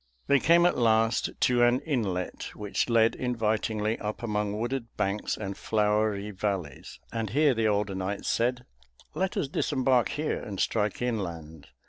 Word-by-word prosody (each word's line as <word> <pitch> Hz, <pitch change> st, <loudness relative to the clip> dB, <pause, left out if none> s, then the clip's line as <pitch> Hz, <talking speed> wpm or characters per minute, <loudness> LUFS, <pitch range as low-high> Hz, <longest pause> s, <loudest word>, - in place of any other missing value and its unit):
They 140 Hz, -, +4 dB
came 170 Hz, +3 st, +5 dB
at 175 Hz, -, +2 dB
last 115 Hz, -1 st, +3 dB
to 125 Hz, -1 st, +3 dB
an 120 Hz, +1 st, +4 dB
inlet 105 Hz, -, -3 dB
which 105 Hz, +3 st, -2 dB
led 115 Hz, -1 st, +4 dB
invitingly 110 Hz, -2 st, -1 dB
up 105 Hz, +2 st, -5 dB
among 105 Hz, -2 st, -1 dB
wooded 120 Hz, +1 st, -2 dB
banks 100 Hz, +2 st, -1 dB
and 100 Hz, -2 st, -5 dB
flowery 105 Hz, -1 st, 0 dB
valleys, 95 Hz, -8 st, -4 dB
and 115 Hz, -2 st, -2 dB
here 145 Hz, +5 st, +3 dB
the 115 Hz, -2 st, +1 dB
older 105 Hz, -1 st, 0 dB
knight 95 Hz, +2 st, -3 dB
said, 125 Hz, +1 st, 0 dB, 0.5 s
"Let 190 Hz, 0 st, -1 dB
us -, -, 0 dB
disembark 130 Hz, -3 st, +1 dB
here 150 Hz, +1 st, -2 dB
and 100 Hz, -4 st, -6 dB
strike 105 Hz, +1 st, 0 dB
inland. 85 Hz, -10 st, -4 dB
110 Hz, 150 wpm, -28 LUFS, 105-125 Hz, 0.5 s, came